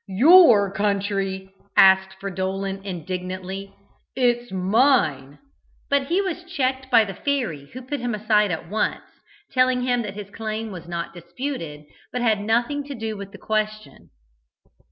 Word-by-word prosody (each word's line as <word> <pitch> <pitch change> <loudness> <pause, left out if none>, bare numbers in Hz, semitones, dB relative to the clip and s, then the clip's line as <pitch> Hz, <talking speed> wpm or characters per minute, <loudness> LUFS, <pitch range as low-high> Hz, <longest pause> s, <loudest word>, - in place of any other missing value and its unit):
"Your 230 - +7
country?" 195 -1 -2 0.2
asked 190 0 +6
Fridolin 195 0 -3
indignantly. 185 +1 -5 0.4
"It 245 -2 +3
is 240 -3 -16
mine!" 185 - +2 0.5
but 280 -1 +2
he 365 +6 +1
was 355 -2 -4
checked 265 -6 -2
by 225 - +5
the 195 - -6
fairy, 190 - -2
who 255 +1 -8
put 280 +3 -4
him 240 -2 -2
aside 210 -1 +2
at 165 -1 -4
once, 210 +4 -1 0.5
telling 255 -1 +2
him 245 -1 +1
that 205 -3 -6
his 205 -1 -8
claim 220 0 -4
was 175 -3 -9
not 170 -1 -4
disputed, 170 - -6 0.3
but 250 -1 -2
had 215 -3 +2
nothing 235 +7 0
to 285 -1 -7
do 220 -2 -4
with 200 -1 -8
the 205 - -11
question. 215 0 -3
210 Hz, 150 wpm, -23 LUFS, 190-250 Hz, 0.5 s, Your